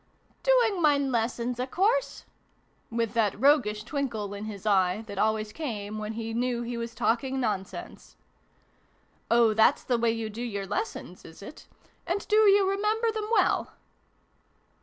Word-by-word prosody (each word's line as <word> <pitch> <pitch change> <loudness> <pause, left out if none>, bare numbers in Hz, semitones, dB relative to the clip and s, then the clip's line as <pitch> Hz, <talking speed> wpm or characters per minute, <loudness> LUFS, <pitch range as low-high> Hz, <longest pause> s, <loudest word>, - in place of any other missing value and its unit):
" - - -37
Doing 475 -7 +3
mine 285 -3 +3
lessons, 235 +1 -1
a 250 - -1
course! 440 - 0 0.3
" - - -39 0.3
With 230 -2 -2
that 215 -4 +1
roguish 215 -6 +3
twinkle 235 -6 -3
in 205 +1 -6
his 210 -2 -8
eye, 195 0 +2
that 200 -2 -7
always 215 -1 0
came 215 -8 -5
when 215 +1 -4
he 225 0 -5
knew 240 0 -1
he 240 +1 -4
was 235 0 -5
talking 245 +3 0
nonsense. 205 -6 -5 0.5
" - - -38
Oh, 235 -2 +4
thafs 220 +6 +4
the 245 -2 +1
way 230 0 +2
you 225 -1 -2
do 225 +3 -7
your 205 -5 -3
lessons, 195 -2 -5
is 160 +4 -13
it? 290 - -11 0.4
And 365 +4 -2
do 425 - +2
you 405 -2 +5
remember 425 +4 +1
them 435 -1 -4
well 460 - +2
235 Hz, 165 wpm, -27 LUFS, 215-295 Hz, 0.5 s, you